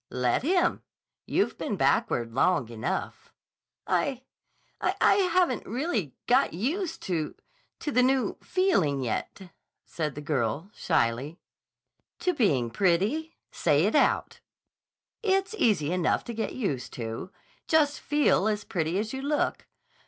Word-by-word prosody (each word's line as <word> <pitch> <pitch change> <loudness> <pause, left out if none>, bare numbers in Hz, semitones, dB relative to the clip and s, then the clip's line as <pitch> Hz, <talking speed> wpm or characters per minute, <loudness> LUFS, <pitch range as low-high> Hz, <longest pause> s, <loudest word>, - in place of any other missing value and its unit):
"Let 125 -1 +1
him. 355 +6 +2 0.5
You've - - 0
been - - -2
backward 115 -1 +1
long 140 -2 +2
enough." 120 +12 -4 0.5
"I—I—I 260 -2 -1
haven't 360 - +2
really 225 - -2
got 255 -6 +3
used 325 - -2
to—to 185 - -5
the 250 - +4
new 260 0 +2
feeling 185 - +1
yet," 175 - -4 0.3
said 155 -3 -3
the - - -5
girl 145 - -1
shyly. 140 0 0 0.8
"To 360 - +1
being 140 - +1
pretty? 200 - +1 0.2
Say - - +2
it - - +1
out. - - +2 0.8
It's 390 -1 +1
easy 180 -9 +2
enough 180 -2 +1
to 235 - -6
get 225 0 -3
used 145 - -3
to. 115 +7 -5 0.4
Just 300 -2 +3
feel 295 -8 +2
as 210 -1 -1
pretty 165 0 -1
as 215 +3 -2
you 265 - -4
look. 290 +2 -1
205 Hz, 125 wpm, -27 LUFS, -, 0.8 s, the